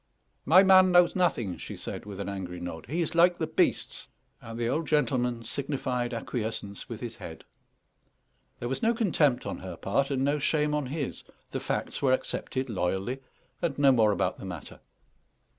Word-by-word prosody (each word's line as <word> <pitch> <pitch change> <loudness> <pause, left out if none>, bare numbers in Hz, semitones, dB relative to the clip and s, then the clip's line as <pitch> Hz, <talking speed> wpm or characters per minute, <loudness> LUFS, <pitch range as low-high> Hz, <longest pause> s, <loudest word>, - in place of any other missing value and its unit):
"My 180 +6 +7
man 185 -1 +7
knows 175 -1 +5
nothing," 125 - +1
she - - -8
said, - - -7
with 100 -2 -7
an 100 - -3
angry 95 -3 -5
nod; 80 -2 -7
"he 165 +7 -1
is 165 - -1
like 175 +1 +5
the 160 - -1
beasts." - - 0 0.3
And 115 0 -8
the 115 - 0
old 155 +6 -1
gentleman 125 -6 +1
signified 130 -3 -2
acquiescence 110 -4 -4
with - - -6
his - - -6
head. - - -9 1.2
There 120 - -3
was 135 +1 -3
no 230 +1 +3
contempt 155 - +2
on - - -4
her 90 -2 -7
part, 135 +8 0
and 135 -1 0
no 145 +1 +1
shame 150 +1 +1
on 150 -3 -1
his; 140 +1 -4 0.3
the - - -2
facts - - -3
were 130 -2 +4
accepted 130 0 -2
loyally, 100 +4 -1 0.4
and 165 -5 -1
no 140 -1 +6
more 110 -4 +4
about - - -1
the - - -7
matter. 90 -5 -8
130 Hz, 180 wpm, -28 LUFS, 110-155 Hz, 1.2 s, My